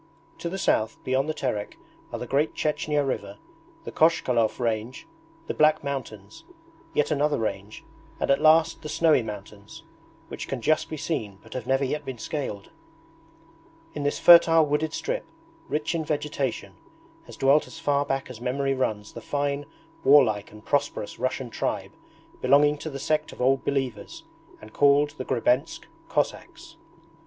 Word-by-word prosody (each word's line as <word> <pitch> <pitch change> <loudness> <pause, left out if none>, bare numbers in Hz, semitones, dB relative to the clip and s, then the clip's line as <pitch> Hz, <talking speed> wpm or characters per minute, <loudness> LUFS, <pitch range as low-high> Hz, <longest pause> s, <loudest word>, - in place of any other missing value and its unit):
To 170 - -3
the 190 - -4
south, 110 - +1
beyond 135 +3 0
the - - 0
Terek, 105 -8 -3 0.3
are - - -3
the - - -5
Great 145 +3 0
Chechnya 150 -1 0
river, 100 -6 -4 0.5
the - - -7
Kochkalov 125 -9 +2
range, 115 - -2 0.4
the - - -3
Black 155 0 +3
Mountains, 110 -8 -6 0.5
yet 150 - +1
another 150 0 +1
range, 105 -1 -4 0.4
and - - +1
at 140 - +3
last 160 +1 +4
the 155 - -7
snowy 155 -3 +3
mountains, 105 -2 -9 0.4
which - - -7
can 135 - -3
just 155 +6 +1
be 155 - -5
seen 110 -11 -3
but - - -12
have 125 -2 -5
never 135 +1 +2
yet 150 +3 -3
been 130 -3 -6
scaled. 110 -6 -5 1.2
In 150 - -5
this 145 0 0
fertile 165 -2 +7
wooded 150 +1 0
strip, 485 - -3 0.4
rich 150 +2 -1
in 165 -1 -1
vegetation, 145 -4 -3 0.5
has - - -11
dwelt 140 +3 +3
as - - -11
far 145 -3 +1
back 135 -1 -2
as 120 -3 -10
memory 135 +2 0
runs 110 -5 -2
the 115 - -8
fine 145 +3 -2 0.4
warlike 125 -7 +4
and 105 0 -14
prosperous 145 -7 -1
Russian 130 -1 -2
tribe - - -3 0.5
belonging 145 +3 +4
to 160 - -5
the 140 - -6
sect 155 +2 -1
of - - -15
Old 135 +1 +2
Believers, 135 - -3 0.4
and - - -14
called 145 +1 +4
the 130 - -4
Grebensk 125 +3 0 0.3
Cossacks. 330 -1 -3
140 Hz, 160 wpm, -26 LUFS, 120-150 Hz, 1.2 s, fertile